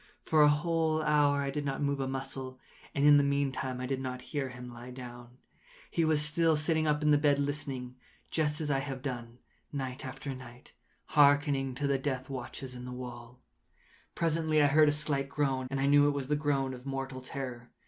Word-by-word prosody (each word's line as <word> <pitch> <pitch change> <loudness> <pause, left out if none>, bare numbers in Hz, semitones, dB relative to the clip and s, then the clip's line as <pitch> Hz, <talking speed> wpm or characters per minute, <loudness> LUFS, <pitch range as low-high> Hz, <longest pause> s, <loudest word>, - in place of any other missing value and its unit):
For 155 -1 +3
a 150 - +8
whole 155 +1 +1
hour 145 -2 +3
I 140 - -2
did 145 +1 -3
not 135 -1 -2
move 140 0 0
a 135 - -1
muscle, 130 -1 -5 0.4
and 140 - +2
in 145 0 +8
the 145 - +4
meantime 140 -2 -1
I 130 - -3
did 130 0 -2
not 125 -1 -5
hear 140 -3 -1
him 125 0 -9
lie 120 +1 -9
down. 120 -1 -10 0.5
He 170 - +1
was 155 -2 +3
still 160 +1 +3
sitting 155 +1 +1
up 150 0 +1
in 150 - +4
the 145 - +5
bed 145 -1 +3
listening;—just 145 +1 -3
as 150 -2 -1
I 135 - +2
have 135 -2 -5
done, 120 -3 -5 0.3
night 130 -2 -4
after 135 +1 -5
night, 125 -1 -12 0.4
hearkening 145 -3 +4
to 145 - -2
the 140 -1 +1
death 130 -1 -3
watches 130 0 -6
in 125 0 -8
the 125 - -6
wall. 125 0 -9 0.7
Presently 160 -1 +1
I 145 - +6
heard 150 +1 +5
a - - +3
slight 145 -2 -1
groan, 135 -3 0
and 135 0 -2
I 135 - +2
knew 145 +1 +6
it 145 - +1
was 135 -1 -4
the 150 - +3
groan 140 -3 0
of 125 -1 -9
mortal 135 -1 -4
terror. 125 -2 -6
140 Hz, 205 wpm, -31 LUFS, 130-150 Hz, 0.7 s, a